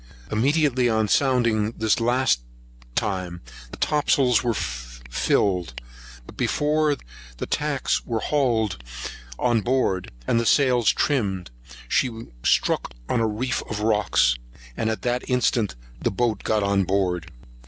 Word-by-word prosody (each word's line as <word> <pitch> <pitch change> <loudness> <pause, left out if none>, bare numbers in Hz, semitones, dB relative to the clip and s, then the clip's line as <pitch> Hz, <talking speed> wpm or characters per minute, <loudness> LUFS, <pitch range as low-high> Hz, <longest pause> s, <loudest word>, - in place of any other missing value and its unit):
Immediately 130 +1 +2
on 110 -1 +2
sounding 115 -4 +2
this 110 0 +2
last 120 - +2 0.5
time, 90 -4 -2 0.3
the - - -10
topsails 135 -5 +3
were 120 -2 0
filled; 60 +5 -1 0.5
but - - -13
before 150 0 +1 0.4
the - - -3
tacks 150 -3 0
were 115 -2 -2
hauled 110 - 0 0.5
on 120 -3 +2
board, 120 -7 0 0.2
and 115 - +2
the 115 - -1
sails 125 -5 +4
trimmed, 100 - -1 0.4
she 125 - +2 0.3
struck - - +1
on - - +1
a 115 - +2
reef 115 +4 -1
of 105 -1 -3
rocks, 105 - +3 0.4
and 110 - -1
at 110 - -3
that 125 0 -1
instant 120 - +1 0.3
the - - +1
boat 110 0 0
got 110 -2 +1
on 100 0 +2
board. 90 -3 -1
110 Hz, 130 wpm, -24 LUFS, 95-125 Hz, 0.5 s, sails